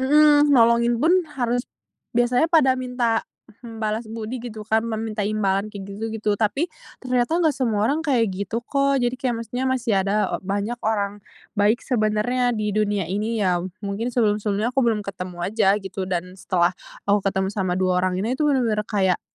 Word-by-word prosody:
mhm, 295 +2 +5
nolongin 235 -1 +4
pun 325 +5 +4 0.2
harus 245 -1 0 0.6
biasanya 245 +6 +3
pada 310 -6 +5
minta, 250 -3 0 0.4
hmm, 225 -1 -8
balas 215 +1 -2
budi 225 +2 -5
gitu 220 -3 -7
kan, 220 +1 +2
meminta 220 -1 -3
imbalan 200 -1 0
kayak 200 -2 -8
gitu 225 +3 -4
gitu, 220 -1 -2
tapi 275 +11 +1 0.4
ternyata 250 +4 +1
enggak 330 -3 +3
semua 225 -6 0
orang 290 +7 +1
kayak 245 -10 +1
gitu 205 +5 -4
kok. 275 +1 +1
Jadi 245 -1 +1
kayak 240 -4 -1
maksudnya 245 +4 -3
masih 250 -4 0
ada 200 +2 0
o - - -2
banyak 205 +5 -3
orang 205 -2 -1 0.3
baik 210 +3 +2
sebenarnya 240 +1 +1
di 210 -1 -1
dunia 205 -2 0
ini 210 +5 -2
ya. 180 -2 +2 0.2
Mungkin 200 +4 -2
sebelum-sebelumnya 215 -1 0
aku 270 - +2
belum 225 -4 +1
ketemu 180 -2 -6
aja 200 0 +2
gitu 195 -2 -5
dan 180 0 -3
setelah 180 -1 +1 0.3
aku 205 0 +3
ketemu 190 0 -1
sama 185 -3 -1
2 185 -1 +2
orang 185 0 0
ini 225 +5 -1
bener-bener 255 -8 +2
kayak, 190 -4 +1
220 Hz, 175 wpm, -23 LUFS, 200-245 Hz, 0.6 s, mhm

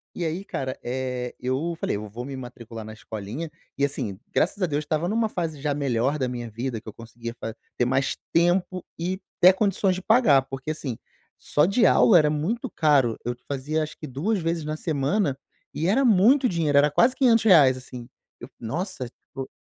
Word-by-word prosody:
e 175 - -3
aí 175 +5 -3
cara, 130 -1 -4
eh, 125 -1 -3
eu 135 +7 -2
falei: - - -1
"eu 105 0 -6
vou 115 +4 -7
me 135 -1 -6
matricular 115 -3 -9
na 110 - -8
escolinha" 110 +9 -6 0.3
e 140 - 0
assim, 120 -9 -4
graças 195 +4 +1
a - - +5
Deus 150 0 -1
estava 160 +3 -1
numa 225 +1 +1
fase 165 -6 -3
já 145 -1 0
melhor 135 0 0
da 130 - 0
minha 120 -2 -5
vida, 115 +1 -4
que 110 - -22
eu 110 - -7
conseguia 115 +1 -8
fa 110 - -5 0.2
ter 120 - +2
mais 130 +2 +1 0.2
tempo 175 +1 +1
e 185 +3 -2 0.2
até 180 +2 +9
condições 195 -1 +1
de 185 - -5
pagar, 200 - +4
porque 135 +3 -5
assim, 135 -7 -5 0.4
só 150 +2 +2
de 220 +6 +3
aula, 185 - +6
era 150 -2 +4
muito 210 - -2
caro. 140 -7 +2
Eu 120 0 -2
fazia 145 +3 -1
acho 155 - -7
que 155 - -8
2 180 - -1
vezes 165 -1 -1
na 155 +1 -3
semana, 150 0 0 0.4
e 165 +3 -1
era 265 +7 +3
muito 245 +6 +5
dinheiro, 160 -7 +1
era 145 +1 +5
quase 250 - +4
R$500, 210 - +5
assim. 125 -2 -9 0.3
Eu: 120 - -10
"nossa, 140 - -4
tipo" 135 +1 -10
150 Hz, 195 wpm, -25 LUFS, 125-180 Hz, 0.4 s, até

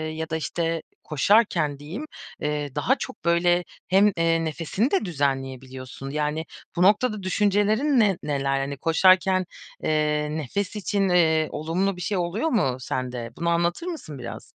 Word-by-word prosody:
ya 160 0 -4
da, 160 - -1
işte, 165 0 -2 0.2
koşarken 155 -3 +2
diyeyim, 180 - -6 0.3
eee, 150 -2 -3
daha 235 - +2
çok, 260 - -8
böyle, 175 +1 +3 0.2
hem, 200 +2 +5
eee, 165 0 +2
nefesini 165 - -1
de 385 - +1
düzenleyebiliyorsun. 135 -3 -3
Yani, 150 +2 -2 0.3
bu 175 - 0
noktada 210 0 +3
düşüncelerin 210 +8 +2
ne 200 -5 +3
neler? 135 -2 0
Hani, 140 +1 -3
koşarken, 185 +4 +4 0.4
eee, 150 -1 +1
nefes 190 - -3
için, 200 -1 0
eee, 160 -3 +3
olumlu 180 +5 -1
bir 180 - -9
şey 195 +3 -1
oluyor 185 - -1
mu 135 - +1
sende? 125 -2 -4
Bunu 170 0 0
anlatır 170 - 0
mısın 155 - -6
biraz? 120 - -7
165 Hz, 150 wpm, -25 LUFS, 150-195 Hz, 0.4 s, hem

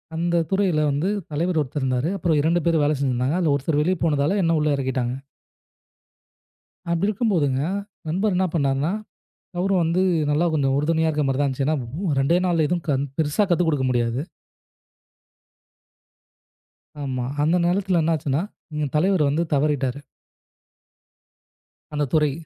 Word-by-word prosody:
அந்தத் 170 -1 0
துறையில 190 -6 +2
வந்து 150 +8 0 0.2
தலைவர் 165 +2 0
ஒருத்தர் 145 +1 -4
இருந்தாரு, 130 +4 0
அப்புறம் 165 -4 +1
2 165 +3 +2
பேரு 165 -1 +3
வேல 150 +1 +2
செஞ்சிருந்தாங்க, 130 +2 0
அதுல 160 -5 +2
ஒருத்தர் 145 +2 0
வெளிய 180 +4 +1
போனதால 150 +5 +1
என்ன 165 0 +2
உள்ள 150 - +1
எறக்கிட்டாங்க. 130 -2 -2 1.7
அப்படி 170 +3 +1
இருக்கும்போது, 200 -8 +1 0.6
நண்பர் 195 +4 0
என்ன 190 +1 +2
பண்ணாருன்னா? 140 +1 +1 0.7
அவரு 195 +2 +1
வந்து, 170 +3 +1 0.3
நல்லா 155 +4 +2
கொஞ்சம் 135 -3 +1
உறுதுணையா 160 +2 +1
இருக்க 150 -1 0
மாதிரிதான் 135 +2 +1
இருந்துச்சு. 135 +1 -2
ஏன்னா 150 +3 -2
2டே 150 +6 +3
நாள்ல 165 -4 +2
எதுவும் 175 +1 -2
க - - +4 0.3
பெருசா 155 +6 +1
கத்துக் 175 0 +2
கொடுக்க 145 -4 0
முடியாது. 120 +1 0 2.8
ஆமா. 130 -3 -3 0.2
அந்த 165 +4 +3
நேரத்துல 185 -1 +1
என்னா 160 +1 +2
ஆச்சுன்னா, 145 +1 -1 0.3
எங்க 150 0 -1
தலைவர் 175 -2 +2
வந்து 155 +4 +1
தவறிட்டாரு. 140 -2 0 1.9
அந்தத் 145 -3 -1
துறை. 150 -3 +3
155 Hz, 135 wpm, -23 LUFS, 140-170 Hz, 2.8 s, க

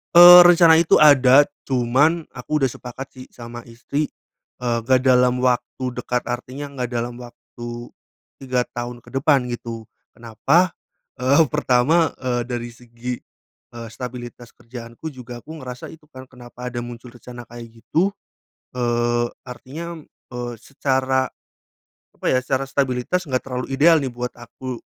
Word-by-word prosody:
Eee, 175 +1 +12
rencana 170 -2 +6
itu 165 - +4
ada 140 -2 +7 0.2
cuman 135 +6 +2
aku 135 +4 -3
udah 135 - +3
sepakat 125 +2 -8
sih 130 -1 -12
sama 120 0 -10
istri, 140 +6 -3 0.6
eee, 120 -1 +1
gak 130 -1 +3
dalam 125 -1 +4
waktu 130 +1 0
dekat. 125 0 -2
Artinya 130 +4 -6
gak 125 -1 -2
dalam 120 +1 -3
waktu 120 0 -10 0.5
3 125 -2 -1
tahun 120 0 -6
ke - - -16
depan 135 -3 +2
gitu. 115 -1 -6 0.3
Kenapa? 140 +10 +1 0.5
Eee, 135 +5 +4
pertama, 145 +6 +2
eee, 125 -2 -2
dari 120 -1 -4
segi, 120 +1 -7 0.6
eee, 115 -1 -7
stabilitas 120 0 -9
kerjaanku 120 +5 -9
juga 120 -3 -10
aku 160 +1 -10
ngerasa 125 -2 -8
itu 155 -1 -16
kan, 130 -3 -12
kenapa 125 0 -9
ada 120 - -4
muncul 120 0 -9
rencana 120 0 -11
kayak 120 0 -11 0.2
gitu, 190 +5 +1 0.6
eee, 120 -1 +1 0.2
artinya, 155 +7 -8 0.3
eee, 120 -1 -5
secara 130 -1 0 0.9
apa - - -12
ya, - - +3
secara 135 +1 -1
stabilitas 135 +6 -1
enggak 130 -1 0
terlalu 125 -1 -4
ideal 160 +5 +5
nih 135 - -2
buat 125 0 -5
aku, 120 +1 -8
125 Hz, 140 wpm, -21 LUFS, 120-135 Hz, 0.9 s, Eee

